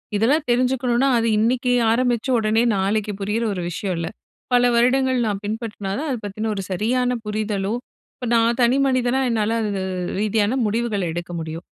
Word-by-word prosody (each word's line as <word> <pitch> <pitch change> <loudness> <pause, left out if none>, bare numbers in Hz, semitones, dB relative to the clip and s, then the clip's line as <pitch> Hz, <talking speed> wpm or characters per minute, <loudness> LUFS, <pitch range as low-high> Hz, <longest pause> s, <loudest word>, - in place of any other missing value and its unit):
இதெல்லாம் 275 +9 +2
தெரிஞ்சுக்கணுனா 250 +1 +2
அது 230 0 +1
இன்னிக்கு 245 +3 +1 0.2
ஆரம்பிச்சு 240 +1 +1
உடனே 220 0 +2
நாளைக்கு 205 +2 0
புரியிற 210 +4 -1
ஒரு 180 - -4
விஷயம் 185 +1 -3
இல்ல. 165 0 -3 0.5
பல 245 0 +5
வருடங்கள் 260 +2 +3
நான் 200 -2 -2
பின்பற்றினா 215 -2 -4
தான் 310 +1 -3
அத 260 - -1
பத்தின 215 +2 -3
ஒரு 195 - -3
சரியான 245 +6 0
புரிதலோ 210 -1 -2 0.4
இப்ப 250 - -6
நான் 230 +1 +3
தனி 240 +3 +4
மனிதனா 255 -1 +1
என்னால 225 -1 0
அது 205 -3 -2 0.4
ரீதியான 215 +1 +1
முடிவுகள 215 -1 -1
எடுக்க 175 +1 -5
முடியும். 160 +1 -6
225 Hz, 160 wpm, -22 LUFS, 205-245 Hz, 0.5 s, பல